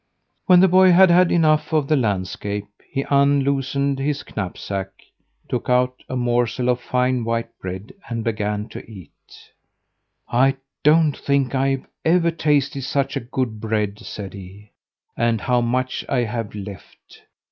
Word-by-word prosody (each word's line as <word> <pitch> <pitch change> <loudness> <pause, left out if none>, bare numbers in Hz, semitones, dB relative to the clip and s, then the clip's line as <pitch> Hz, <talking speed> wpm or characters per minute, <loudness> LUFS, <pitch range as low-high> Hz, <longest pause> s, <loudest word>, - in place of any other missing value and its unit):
When 180 -1 +7
the 190 - +6
boy 185 0 +6
had 185 0 +7
had 180 0 +5
enough 155 -2 +2
of 155 -3 +1
the 155 - +3
landscape 100 -3 -2 0.2
he 135 - -2
unloosed 140 0 +2
his 140 +1 -1
knapsack, 95 0 -4 0.6
took - - -3
out 125 0 +1
a 130 - -3
morsel 120 0 0
of 125 0 +1
fine 125 -1 0
white 115 0 -3
bread, 95 +2 -7 0.2
and 115 -2 -3
began 105 -1 -2
to - - -7
eat. 95 -8 -12 1.2
"I 135 +3 +2 0.2
don't 155 0 +4
think 140 -2 0
I've 135 0 0 0.2
ever 170 +1 +3
tasted 145 -4 0
such 135 +1 -1
good 125 -6 -2
bread," 105 -2 -1
said 105 -4 -8
he. 100 +2 -12 0.4
"And 115 -1 +1
how 125 -2 +1
much 125 +2 -1
I 130 -3 +1
have 115 -2 -4
left! 100 -2 -11
125 Hz, 145 wpm, -21 LUFS, 110-140 Hz, 1.2 s, When